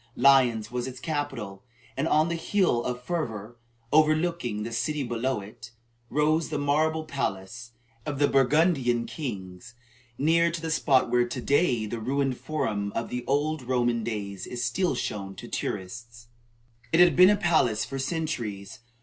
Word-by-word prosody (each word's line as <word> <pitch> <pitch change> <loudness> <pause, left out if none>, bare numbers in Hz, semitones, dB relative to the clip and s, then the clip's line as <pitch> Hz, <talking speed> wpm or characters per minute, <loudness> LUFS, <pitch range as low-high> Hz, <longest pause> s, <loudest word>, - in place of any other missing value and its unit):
Lyons 125 -5 +4
was 125 0 -3
its 130 -1 -8
capital, 130 -10 -4 0.3
and 140 +4 -1
on 155 0 +3
the 170 - -2
hill 170 -8 +1
of 125 0 -3
Fourviere, 120 - -4 0.4
overlooking 155 -7 +2
the 115 - -5
city 135 +6 -1
below 120 -1 -2
it, 105 +3 -11 0.4
rose 155 +3 +1
the 155 - -2
marble 155 +3 +1
palace 120 -4 -4 0.3
of 145 +2 -4
the 145 +1 +3
Burgundian 135 -3 +2
kings, 110 - -7 0.4
near 165 +4 +3
to 170 0 -4
the 160 0 -4
spot 140 -4 +2
where, 120 0 +3
to 125 - -5
day, 125 -4 +2
the 115 +2 -4
ruined 135 +2 -1
forum 105 -10 -2
of 115 - -2
the 125 0 -4
old 145 +2 0
Roman 120 -2 0
days 100 -4 -4
is 120 -1 -3
still 135 +6 0
shown 100 -5 -4
to - - -9
tourists. 115 +4 -6 0.6
It 165 - +3
had 175 -1 +6
been 180 +1 +8
a 210 - +5
palace 155 - +2
for 135 - -5
centuries. 130 - -4
125 Hz, 160 wpm, -27 LUFS, 115-155 Hz, 0.6 s, been